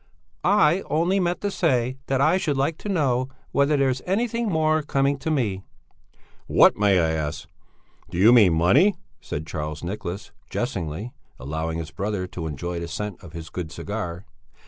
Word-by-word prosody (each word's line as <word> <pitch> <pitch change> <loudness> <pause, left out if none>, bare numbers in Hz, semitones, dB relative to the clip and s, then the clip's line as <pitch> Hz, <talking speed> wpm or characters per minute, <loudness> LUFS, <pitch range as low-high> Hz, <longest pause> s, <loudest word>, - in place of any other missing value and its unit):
"I 185 -2 +4
only 170 +6 +2
meant 175 -1 0
to 205 - -1
say 130 -8 0
that 135 -1 +1
I 155 +6 +4
should 150 -7 -1
like 145 +4 0
to 210 - -6
know 130 -8 +1 0.2
whether 140 +1 +3
there's 130 -2 +1
anything 230 +3 0
more 155 -2 +2
coming 140 -1 0
to 160 - -3
me?" 110 -11 0 0.9
"What, - - +6
may 100 -2 +3
I 80 -1 +2
ask? 80 0 -3 0.6
Do 85 - -5
you 110 +6 +7
mean 105 -8 +6
money?" 135 - +4 0.2
said 75 +2 -5
Charles 75 -1 -5
Nicholas, 95 +1 -5 0.2
jestingly, 100 - -3 0.3
allowing 80 +5 -3
his 80 -2 -5
brother 100 -1 -2
to 90 -3 -6
enjoy 85 +4 -4
the 85 - -5
scent 100 +3 -5
of 85 -3 -12
his 85 -1 -8
good 85 -3 -5
cigar. 100 -2 -5
110 Hz, 170 wpm, -24 LUFS, -, 0.9 s, you